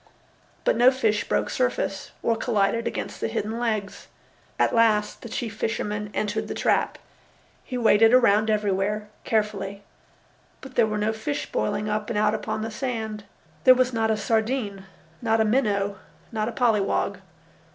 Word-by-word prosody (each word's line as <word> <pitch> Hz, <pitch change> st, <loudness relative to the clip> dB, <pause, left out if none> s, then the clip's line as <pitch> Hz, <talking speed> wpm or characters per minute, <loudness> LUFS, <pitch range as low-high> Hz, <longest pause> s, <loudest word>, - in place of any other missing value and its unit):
But -, -, +2 dB
no 245 Hz, +1 st, +7 dB
fish 225 Hz, -5 st, 0 dB
broke -, -, 0 dB
surface -, -, -1 dB
or 230 Hz, -, +2 dB
collided 225 Hz, 0 st, 0 dB
against -, -, -5 dB
the -, -, 0 dB
hidden 220 Hz, +3 st, -3 dB
legs. 215 Hz, -4 st, -2 dB, 0.5 s
At -, -, +2 dB
last 215 Hz, -2 st, +2 dB
the 235 Hz, -, -8 dB
chief 225 Hz, -1 st, -4 dB
fisherman 210 Hz, -2 st, -2 dB
entered 215 Hz, +1 st, -1 dB
the -, -, -5 dB
trap. -, -, +1 dB, 0.7 s
He 250 Hz, -, -5 dB
waded 225 Hz, -1 st, +5 dB
around 220 Hz, -4 st, +4 dB
everywhere, 210 Hz, 0 st, 0 dB, 0.2 s
carefully. 200 Hz, -2 st, -1 dB, 0.8 s
But 265 Hz, -1 st, -11 dB
there 235 Hz, -3 st, +3 dB
were 215 Hz, 0 st, -2 dB
no 210 Hz, +1 st, 0 dB
fish 145 Hz, -9 st, -4 dB
boiling 155 Hz, -, -1 dB
up 210 Hz, 0 st, -2 dB
and 230 Hz, -, -1 dB
out 210 Hz, 0 st, +3 dB
upon 215 Hz, 0 st, -3 dB
the 225 Hz, -, -4 dB
sand. 220 Hz, -3 st, -4 dB, 0.4 s
There 255 Hz, -, +8 dB
was 255 Hz, 0 st, +1 dB
not 225 Hz, -1 st, +1 dB
a 220 Hz, -, +2 dB
sardine, 220 Hz, -3 st, -1 dB, 0.4 s
not 225 Hz, -1 st, +2 dB
a 220 Hz, -, +4 dB
minnow, 205 Hz, -4 st, +1 dB, 0.3 s
not 220 Hz, -1 st, -1 dB
a -, -, -4 dB
polly 230 Hz, -4 st, +2 dB
wog. 195 Hz, -, -1 dB
215 Hz, 160 wpm, -25 LUFS, 210-230 Hz, 0.8 s, There